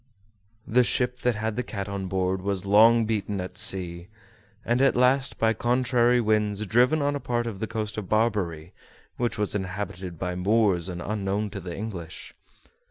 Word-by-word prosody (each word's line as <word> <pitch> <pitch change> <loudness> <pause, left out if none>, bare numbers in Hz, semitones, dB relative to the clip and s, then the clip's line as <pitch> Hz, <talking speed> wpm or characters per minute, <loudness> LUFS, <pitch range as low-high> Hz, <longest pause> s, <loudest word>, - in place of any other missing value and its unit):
The 125 +3 +3
ship 125 +1 0
that 125 -2 0
had 110 0 -3
the 125 - -1
cat 100 -4 -5
on 100 -1 -4
board 95 0 -1
was 100 -1 -2
long 110 +3 +5
beaten 105 -2 -2
at 90 0 -6
sea, 90 -4 +2 0.6
and 120 +3 +1
at 135 - +4
last, 130 +2 +2
by 110 0 +2
contrary 125 +1 +2
winds, 105 -2 0
driven 125 +8 +3
on 145 0 0
a - - -2
part 120 -2 -2
of 110 -5 -5
the 110 - -3
coast 110 -1 -4
of 100 - -8
Barbary 100 -7 0 0.4
which 120 -1 -1
was 105 -1 -1
inhabited 95 -2 -5
by 90 +2 -3
Moors 95 -1 +1
unknown 100 +3 -3
to 100 -1 -6
the 85 -1 -6
English. 95 -6 -7
105 Hz, 170 wpm, -25 LUFS, 95-120 Hz, 0.6 s, long